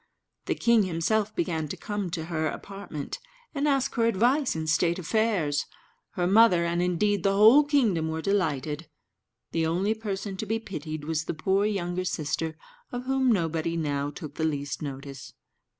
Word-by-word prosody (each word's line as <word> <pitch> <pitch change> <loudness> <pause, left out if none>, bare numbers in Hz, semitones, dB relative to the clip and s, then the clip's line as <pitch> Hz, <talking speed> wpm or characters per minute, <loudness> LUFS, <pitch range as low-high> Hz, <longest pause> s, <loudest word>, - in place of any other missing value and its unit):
The - - +1
king 235 -2 +4
himself 200 +5 0
began 160 -3 -1
to - - -6
come 205 -3 -3
to 165 -2 -4
her 160 -2 -1
apartment, 195 -6 -6 0.3
and 290 0 0
ask 275 -2 +1
her 230 -1 +2
advice 245 - +2
in 160 0 -3
state 170 +2 +2
affairs. 185 -5 0 0.5
Her 175 - 0
mother, 185 -3 +5
and 170 +1 0
indeed 180 +3 +1
the 195 +2 +2
whole 225 +8 +8
kingdom, 235 - +2
were 160 0 -2
delighted; 160 -5 -1 0.6
the 165 -1 +1
only 185 +6 +1
person 200 -3 -4
to 215 - -4
be 225 +2 0
pitied 155 -8 -6
was 160 +1 -2
the - - -3
poor 190 +6 +1
younger 185 -3 -2
sister, 160 -1 -2 0.3
of 245 0 -4
whom 265 -1 +2
nobody 165 -3 0
now 145 -3 -1
took 145 0 -8
the 160 - -1
least 145 -3 -2
notice. 140 -2 -7
175 Hz, 165 wpm, -27 LUFS, 160-215 Hz, 0.6 s, whole